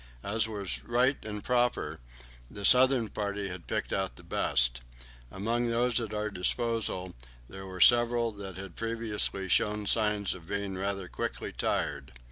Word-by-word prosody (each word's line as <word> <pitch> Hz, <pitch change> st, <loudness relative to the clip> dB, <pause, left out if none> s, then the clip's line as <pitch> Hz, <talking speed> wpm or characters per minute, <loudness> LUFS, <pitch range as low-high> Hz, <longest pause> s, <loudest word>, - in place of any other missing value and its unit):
As 110 Hz, +3 st, +1 dB
was 100 Hz, -4 st, -3 dB
right 125 Hz, +3 st, +2 dB
and 105 Hz, -2 st, -6 dB
proper, 125 Hz, -1 st, 0 dB, 0.5 s
the 100 Hz, -, -5 dB
southern 125 Hz, -2 st, +5 dB
party 100 Hz, -1 st, -3 dB
had 90 Hz, -2 st, -8 dB
picked -, -, -2 dB
out 95 Hz, -1 st, -2 dB
the -, -, -14 dB
best. -, -, +1 dB, 0.5 s
Among 115 Hz, -, -1 dB
those 120 Hz, +1 st, +2 dB
at 115 Hz, -3 st, -4 dB
our 105 Hz, 0 st, -2 dB
disposal 95 Hz, -1 st, 0 dB, 0.3 s
there 95 Hz, +4 st, -9 dB
were 90 Hz, -1 st, -7 dB
several 120 Hz, +1 st, +5 dB
that 100 Hz, -3 st, -8 dB
had 95 Hz, -2 st, -8 dB
previously 115 Hz, -4 st, -1 dB
shown 105 Hz, +3 st, +1 dB
signs 105 Hz, -2 st, +2 dB
of 85 Hz, -3 st, -12 dB
being 100 Hz, -1 st, -3 dB
rather 100 Hz, 0 st, -2 dB
quickly -, -, -4 dB
tired. 70 Hz, -3 st, -2 dB
105 Hz, 150 wpm, -29 LUFS, 95-115 Hz, 0.5 s, southern